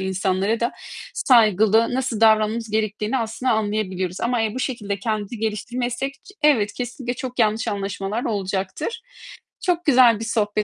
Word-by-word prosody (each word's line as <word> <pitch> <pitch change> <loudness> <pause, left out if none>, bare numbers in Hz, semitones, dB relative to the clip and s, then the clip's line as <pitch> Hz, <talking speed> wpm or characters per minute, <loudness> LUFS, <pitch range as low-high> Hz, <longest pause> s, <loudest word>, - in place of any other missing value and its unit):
insanlara 190 +3 0
da 235 - 0 0.4
saygılı, 220 -1 +4
nasıl 255 -4 -1
davranmamız 220 0 +3
gerektiğini 215 +3 -1
aslında 230 +3 -1
anlayabiliyoruz. 205 -4 -2
Ama, 235 0 0
eee, 220 -1 -1
bu - - -3
şekilde 210 -7 -3
kendimizi 215 +2 -3
geliştirmezsek 240 +4 -2
ç 275 - -18
Evet, 230 -9 +3
kesinlikle 245 0 -4
çok 255 +1 -6
yanlış 220 -1 +2
anlaşmalar 200 +2 -3
olacaktır. 200 - -3 0.6
Çok 355 -3 +1
güzel 245 -6 +5
bir 225 - -3
sohbet. 215 -3 -1
220 Hz, 140 wpm, -22 LUFS, 205-245 Hz, 0.6 s, güzel